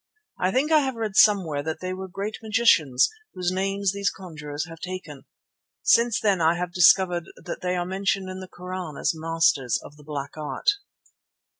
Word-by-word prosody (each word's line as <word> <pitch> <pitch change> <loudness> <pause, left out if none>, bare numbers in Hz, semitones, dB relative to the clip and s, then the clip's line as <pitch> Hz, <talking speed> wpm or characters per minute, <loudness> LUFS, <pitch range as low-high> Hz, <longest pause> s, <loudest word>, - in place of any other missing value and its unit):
"I 185 - +1
think 280 +7 +1
I 310 - +7
have 265 -3 -1
read 220 -3 -3
somewhere 185 -10 +4
that 160 +2 -4
they 185 0 -4
were 190 +1 -6
great 200 +4 -5
magicians, 210 - +3 0.3
whose 180 -1 -1
names 195 +1 0
these 200 0 0
conjurers 150 -5 -6
have 165 -1 -11
taken." 180 -7 -7 0.6
(Since 235 -1 +4
then 200 -5 +1
I 165 +1 +4
have 175 0 -4
discovered 180 -1 +5
that 175 - -7
they 180 0 -1
are 175 -1 -1
mentioned 190 +1 -1
in 185 0 -6
the 185 - -8
Koran 180 -4 -7
as - - +1
masters 165 -5 +1
of 145 - -13
the 150 - -16
Black 145 -1 -6
Art.) 155 - 0
180 Hz, 180 wpm, -25 LUFS, 160-195 Hz, 0.6 s, I